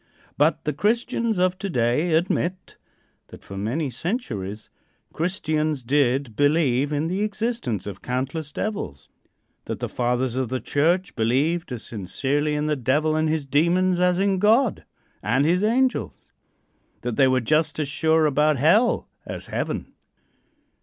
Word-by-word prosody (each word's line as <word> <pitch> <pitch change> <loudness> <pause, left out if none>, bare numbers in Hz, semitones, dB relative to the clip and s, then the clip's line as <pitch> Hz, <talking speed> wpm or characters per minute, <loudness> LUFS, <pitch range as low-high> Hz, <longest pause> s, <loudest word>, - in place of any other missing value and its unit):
But 150 +3 +2
the 150 - -1
Christians 225 - 0
of 185 0 +1
to 200 - -3
day 130 +4 +1
admit 180 +2 -1 0.5
that - - -13
for 100 - -9
many 125 +9 -2
centuries 110 - -4 0.4
Christians 155 -5 -1
did 130 -2 +1
believe 145 -1 +2
in 150 +2 0
the 185 +4 -2
existence 210 - -2
of 100 -2 -7
countless 135 +5 -3
devils; 120 - -4 0.6
that - - -4
the - - -2
Fathers 125 0 -1
of 130 -3 -1
the 130 0 -2
church 165 - 0
believed 140 +9 0
as 120 -3 -5
sincerely 140 +9 -1
in 150 0 -1
the 150 0 +1
Devil 150 +4 +1
and 155 0 +1
his 155 -2 -1
demons 175 +6 +2
as 180 0 +3
in 195 0 +1
God 220 +4 +3 0.4
and 130 +6 +1
his 180 +5 +2
angels; 225 - 0 0.7
that 120 -2 -3
they 135 -2 +5
were 130 0 +3
just 155 +6 +1
as 155 -2 -1
sure 160 +2 +2
about 150 0 +3
hell 185 - +3 0.2
as - - -6
heaven. - - -3
150 Hz, 145 wpm, -24 LUFS, 130-180 Hz, 0.7 s, they